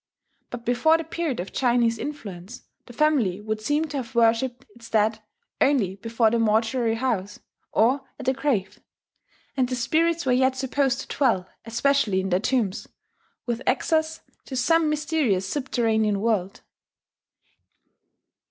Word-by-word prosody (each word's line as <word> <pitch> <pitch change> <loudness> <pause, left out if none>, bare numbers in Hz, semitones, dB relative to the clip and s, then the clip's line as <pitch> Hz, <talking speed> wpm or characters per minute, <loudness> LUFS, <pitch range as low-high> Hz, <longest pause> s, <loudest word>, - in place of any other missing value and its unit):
But 235 -1 -8
before 315 +7 +3
the 330 - -4
period 325 -5 -3
of 180 - -5
Chinese 235 -3 +2
influence 220 -7 -7 0.2
the - - -11
family 245 -10 +2
would 215 +1 -4
seem 295 +7 0
to 285 - -4
have 255 -1 -6
worshipped 235 +2 +2
its 230 -1 -13
dead 220 0 +1 0.4
only 215 -10 +2
before 230 +1 +1
the 235 - +1
mortuary 225 +1 +1
house, 225 -5 -2 0.3
or 250 +6 +3 0.2
at 270 - -7
the 260 - +2
grave; 250 -8 -1 0.8
and 255 -3 +1
the 255 - -1
spirits 320 +7 +1
were 260 - +2
yet 260 +1 +3
supposed 265 0 0
to - - -7
dwell 230 -10 +2 0.2
especially 230 -3 +1
in 190 0 -2
their 180 0 +2
tombs, 220 -4 -1 0.6
with 240 0 -2
access 315 +4 +1 0.2
to 265 - -7
some 320 +5 +3
mysterious 295 - 0
subterranean 220 -5 0
world. 200 -3 -1
240 Hz, 145 wpm, -24 LUFS, 220-275 Hz, 0.8 s, before